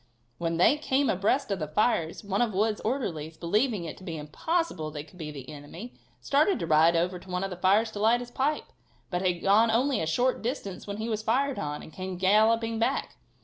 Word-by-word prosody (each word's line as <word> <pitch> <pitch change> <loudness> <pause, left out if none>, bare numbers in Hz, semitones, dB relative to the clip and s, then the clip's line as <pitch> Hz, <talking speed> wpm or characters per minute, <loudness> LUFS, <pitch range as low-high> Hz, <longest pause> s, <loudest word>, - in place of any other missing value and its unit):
When 165 -1 -1
they 185 - +5
came 280 -2 +1
abreast 205 +6 +1
of 195 - -1
the 155 - -3
fires 170 -1 0
one 200 +1 -1
of 225 -5 0
Wood's 210 +2 +1
orderlies, 170 - -3
believing 210 +3 0
it 160 - -7
to - - -14
be 165 -4 -5
impossible 160 - -2
they 150 -1 -6
could 165 +4 -18
be 155 -2 -5
the 140 -4 -9
enemy, 155 - -9 0.3
started 300 +8 +2
to 170 - -3
ride 160 +1 +5
over 180 +2 0
to 185 - -16
one 180 +1 -2
of 195 - -3
the - - -4
fires 200 +5 +3
to 205 - -6
light 225 +3 +4
his 245 0 -8
pipe, 285 +5 0 0.5
but 180 0 -1
had 180 -2 0
gone 215 +4 +5
only 245 +1 +2
a 160 - -1
short 245 +11 +1
distance 225 -7 -4
when 200 0 -4
he 220 +1 -3
was 215 -2 -2
fired 260 +5 0
on, 150 0 -4
and 155 - -12
came 185 -1 -5
galloping 220 +4 +3
back. 230 - -1
200 Hz, 225 wpm, -28 LUFS, 170-230 Hz, 0.5 s, they